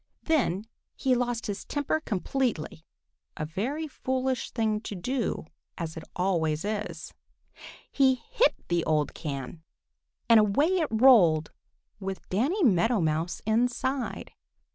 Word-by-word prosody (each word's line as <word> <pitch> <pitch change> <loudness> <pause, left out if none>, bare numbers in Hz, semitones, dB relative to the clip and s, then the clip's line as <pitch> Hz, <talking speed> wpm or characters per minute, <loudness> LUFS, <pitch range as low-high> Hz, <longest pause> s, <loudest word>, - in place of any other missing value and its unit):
Then 230 - +1 0.3
he 265 -2 +1
lost 245 -2 -1
his 205 -1 -4
temper 290 +2 -1
completely, 215 - -2 0.5
a 155 - -2
very 255 - -3
foolish 260 -2 -2
thing 215 -2 0
to 210 - -6
do, 245 +4 -2 0.3
as 160 -1 -4
it 160 - -7
always 170 -3 0
is. 210 0 -4 0.8
He 265 -2 +4 0.2
hit - - +3
the 175 -1 +1
old 150 -2 +1
can, 145 0 -6 0.7
and 230 -1 +7
away 215 - +3
it 320 - +1
rolled 215 -10 +5 0.5
with 195 -1 -6
Danny 285 - +1
Meadow 225 - +3
Mouse 160 +1 -1
inside. 245 +4 -1
220 Hz, 120 wpm, -28 LUFS, 170-260 Hz, 0.8 s, and